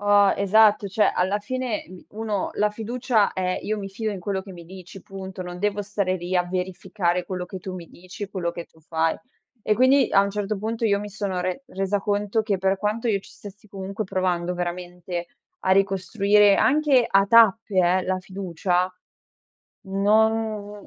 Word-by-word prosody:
Oh, 205 -1 +5
esatto. 205 +1 +4
Cioè, 210 +3 +2
alla 190 +3 +1
fine 245 +1 -3
mi 185 0 -13
uno 215 -2 -3
la 210 - +2
fiducia 225 0 0
è, 185 -1 -2
io 215 0 -2
mi 195 -1 -5
fido 215 +3 -3
in 200 - -5
quello 190 +1 -3
che 195 - -12
mi 170 -2 -11
dici, 185 +2 -11
punto. 190 -1 -8
Non 180 0 -8
devo 205 0 0
stare 195 -2 -1
lì, 175 +1 -5
a 180 - +4
verificare 180 0 -2
quello 180 0 -5
che 185 +1 -8
tu 185 +1 -6
mi 175 -2 -8
dici, 185 +3 -9
quello 185 -3 -2
che 170 0 -7
tu 160 - -25
fai. 160 0 0 0.5
E 215 - +2
quindi, 260 +2 +4
a - - +5
un 200 - -2
certo 205 0 -3
punto, 225 +3 -3
io 200 -2 +3
mi 210 +1 -6
sono 195 -3 -3
re 185 +8 -3
resa 195 -3 -2
conto 205 +1 0
che 205 -3 -1
per 190 +1 +1
quanto 210 +4 -2
io 205 -4 +1
ci - - -17
stessi 205 +1 -13
comunque, 195 +2 -5
provando 180 -3 -1
veramente, 175 0 -5 0.3
a 185 - -1
ricostruire, 195 +1 +3
anche 280 -4 +3
a 195 0 +4
tappe 225 -2 +4
eh, 185 +1 +3
la 185 +1 -1
fiducia. 185 -1 -2 0.9
Non 210 +1 +1
195 Hz, 185 wpm, -24 LUFS, 185-210 Hz, 0.9 s, Oh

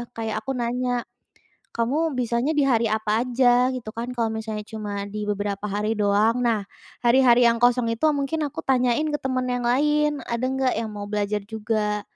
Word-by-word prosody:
kayak 220 -1 -3
aku 220 - -5
nanya, 245 0 -1 0.7
"Kamu 285 +8 0
bisanya 240 +3 0
di 280 - +4
hari 235 -3 +2
apa 215 +1 +1
aja?", 250 0 +3
gitu 250 -4 -5
kan, 235 +2 -4
kalau 230 -2 0
misalnya 215 -1 -5
cuma 205 -2 -5
di 210 +1 -5
beberapa 205 0 -3
hari 210 +2 -1
doang, 215 +3 +2
nah, 220 -4 0 0.4
hari-hari 245 -1 +5
yang 235 0 +2
kosong 245 0 +4
itu 230 - -16
mungkin 290 +2 -1
aku - - -8
tanyain 255 +2 +2
ke - - 0
temen 255 -1 -1
yang 245 -1 -1
lain, 295 +2 +2
ada 235 +1 -3
nggak 265 -1 0
yang 225 -1 -3
mau 205 -1 -6
belajar 210 0 -1
juga, 215 -1 -2
235 Hz, 180 wpm, -24 LUFS, 215-255 Hz, 0.7 s, hari-hari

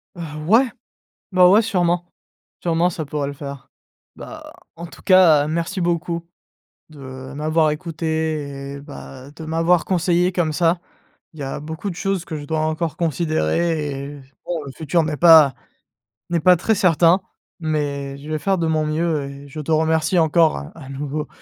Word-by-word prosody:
Heu, 175 - -8 0.3
ouais, 235 +4 +4 0.6
bah, 180 -1 +6
ouais, 210 +4 +6
sûrement, 175 -4 0 0.5
sûrement 170 +1 +1
ça 160 -2 -5
pourrait 145 -1 -3
le 140 - -6
faire. 140 -1 -9 0.5
Bah, - - -10 0.2
en 170 +1 -7
tout - - -14
cas 170 -7 +6
merci 170 +4 -2
beaucoup, 170 -1 -1 0.6
de 130 -2 -10
m'avoir 155 +1 +1
écouté 155 -4 -3
et 140 - -10
bah, 140 -2 -11
de 160 +1 -10
m'avoir 165 +2 +2
conseillé 180 0 +2
comme 170 -4 0
ça. 170 +2 +2 0.5
Il 155 - -14
y 140 - -4
a 135 +1 -4
beaucoup 160 +6 -5
de 175 - -6
choses 195 -3 -1
que 155 - -5
je 145 - -7
dois 160 +1 -1
encore 155 +1 -2
considérer 155 - 0
et 145 - -10
s 135 - -18 0.2
bon 170 -3 -3
le 135 - -7
futur 160 +2 +1
n'est 155 -1 -3
pas 160 -6 +7 0.7
n'est 170 -1 +1
pas 180 +3 +6
très 220 +6 +1
certain, 180 -2 +4 0.4
mais 145 -3 -2
je 145 +2 -10
vais 155 0 -1
faire 190 +5 +1
de 165 - 0
mon 155 -1 +1
mieux. 155 -1 0
Et 140 +1 -11
je 155 - -8
te 160 - -4
remercie 160 +2 +2
encore 160 0 +4
à 70 - -7
à 135 - -11
nouveau 145 +2 -4
160 Hz, 175 wpm, -21 LUFS, 145-170 Hz, 0.7 s, pas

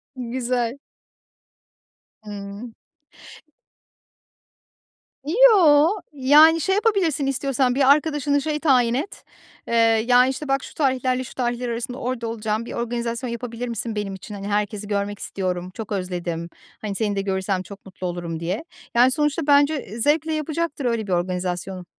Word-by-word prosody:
Güzel. 245 0 -2 1.4
Imm. 205 +2 -8 2.5
Yoo, 340 -6 +6 0.2
yani 300 +4 +6
şey 385 +4 +1
yapabilirsin 390 -9 +1
istiyorsan, 270 -2 0
bir 270 0 +5
arkadaşını 290 -1 +2
şey 300 0 -2
tayin 250 -6 +3
et, 290 +10 -4 0.4
eee, - - -3 0.3
"Ya, 250 0 +6
işte, 270 +3 -4
bak 270 -1 0
şu - - -10
tarihlerle 260 -3 0
şu - - -11
tarihler 245 -1 -2
arasında 240 +2 -4
orada 250 -3 -3
olacağım 220 0 -2
bir - - -7
organizasyon 235 +1 -3
yapabilir 235 0 -5
misin 230 -1 -4
benim 205 -2 -3
için? 205 +2 -9
Hani, 200 0 -6
herkesi 205 0 -2
görmek 205 0 -2
istiyorum, 180 -1 -3
çok 220 -2 -7
özledim, 175 -3 -3 0.3
hani, 205 -2 -4
seni 205 -1 -1
de 195 - 0
görürsem 190 -1 -1
çok 200 +1 -12
mutlu 185 -1 -6
olurum." 170 -2 -4
diye. 180 - -3 0.3
Yani, 250 +2 +6
sonuçta 295 +1 0
bence, 285 +2 +5
eee, 215 +5 -9
zevkle 310 +5 +1
yapacaktır 310 -2 -2
öyle 230 -3 -1
bir 190 - -4
organizasyonu. 180 +1 -2
240 Hz, 140 wpm, -23 LUFS, 200-280 Hz, 2.5 s, Yoo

